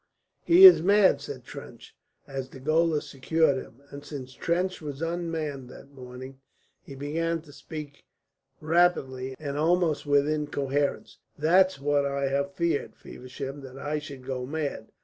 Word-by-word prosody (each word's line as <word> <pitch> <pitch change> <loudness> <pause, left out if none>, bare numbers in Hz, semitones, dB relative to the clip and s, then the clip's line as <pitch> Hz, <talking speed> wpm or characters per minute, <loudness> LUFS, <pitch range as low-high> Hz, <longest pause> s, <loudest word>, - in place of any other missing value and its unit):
"He 355 +3 +8
is 370 - +10
mad!" 200 +2 +4
said - - -8
Trench, - - -11 0.3
as 135 -1 -6
the 130 - -12
gaolers 155 +2 +1
secured 140 +1 +1
him; 130 +1 -10
and 140 0 -9
since 140 -3 -8
Trench 180 +6 -1
was 145 -3 -6
unmanned 165 -5 -3
that 135 - -13
morning 130 0 -10 0.4
he 135 - -11
began 165 +4 -2
to 145 -3 -16
speak 150 -2 -9 0.6
rapidly 145 -6 +1
and 145 -1 -4
almost 165 -2 +1
with 145 0 +3
incoherence. 145 -2 -2 0.2
"That's 185 +3 +3
what 145 0 +1
I 140 0 -1
have 140 +1 -2
feared, 170 -4 -1
Feversham, 135 +2 -8
that 135 -1 -11
I 150 +2 -3
should 140 -4 -10
go 130 -1 -3
mad. 150 0 -4
145 Hz, 150 wpm, -27 LUFS, 135-165 Hz, 0.6 s, is